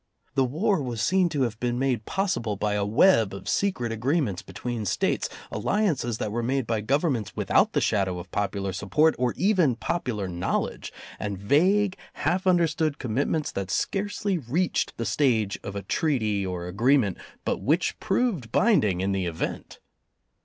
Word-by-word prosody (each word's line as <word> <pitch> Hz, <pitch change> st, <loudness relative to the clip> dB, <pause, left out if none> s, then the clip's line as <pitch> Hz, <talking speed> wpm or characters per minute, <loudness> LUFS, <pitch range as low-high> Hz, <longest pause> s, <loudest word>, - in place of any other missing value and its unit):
The 135 Hz, -2 st, +3 dB
war 175 Hz, -, +1 dB
was 120 Hz, -4 st, -4 dB
seen 185 Hz, +4 st, +3 dB
to 145 Hz, -4 st, 0 dB
have 115 Hz, -3 st, -2 dB
been 120 Hz, 0 st, -1 dB
made 125 Hz, -4 st, 0 dB
possible 180 Hz, -, -1 dB
by 105 Hz, +1 st, -1 dB
a 105 Hz, -1 st, 0 dB
web 110 Hz, -, +4 dB
of 100 Hz, -, -9 dB
secret 155 Hz, -, 0 dB
agreements 120 Hz, -, 0 dB
between 120 Hz, -3 st, -5 dB
States, 100 Hz, -, 0 dB, 0.2 s
alliances 155 Hz, -, 0 dB
that 105 Hz, -, -3 dB
were 120 Hz, +2 st, -1 dB
made 130 Hz, +2 st, 0 dB
by 110 Hz, -2 st, -1 dB
Gov 135 Hz, +7 st, +1 dB
ernments 125 Hz, -, -1 dB
without -, -, +2 dB
the -, -, +2 dB
shadow 95 Hz, -3 st, +1 dB
of 90 Hz, 0 st, -9 dB
popular 100 Hz, -1 st, -2 dB
support 150 Hz, -, +2 dB
or 125 Hz, -1 st, 0 dB
even 185 Hz, -, +3 dB
popular 115 Hz, -, -2 dB
knowledge, 85 Hz, -1 st, -2 dB, 0.3 s
and 100 Hz, -2 st, -3 dB
vague, 185 Hz, -, +2 dB, 0.2 s
half 185 Hz, +2 st, -1 dB
under 175 Hz, -2 st, +5 dB
stood 155 Hz, -2 st, -1 dB
commitments 140 Hz, +5 st, -1 dB
that 100 Hz, -1 st, -4 dB
scarcely 200 Hz, -, -1 dB
reached 160 Hz, +8 st, -1 dB
the 115 Hz, -, -2 dB
stage 110 Hz, -3 st, +1 dB
of 100 Hz, -, -6 dB
a 100 Hz, -, -4 dB
treaty 110 Hz, -, 0 dB
or 90 Hz, -2 st, -4 dB
agreement, 110 Hz, +2 st, +2 dB, 0.3 s
but -, -, -1 dB
which 160 Hz, +6 st, +1 dB
proved 190 Hz, -, 0 dB
bind 220 Hz, -, +4 dB
ing 95 Hz, -4 st, 0 dB
in 95 Hz, +1 st, 0 dB
the 95 Hz, -2 st, -1 dB
event. 80 Hz, -2 st, -4 dB
120 Hz, 170 wpm, -26 LUFS, 105-165 Hz, 0.3 s, under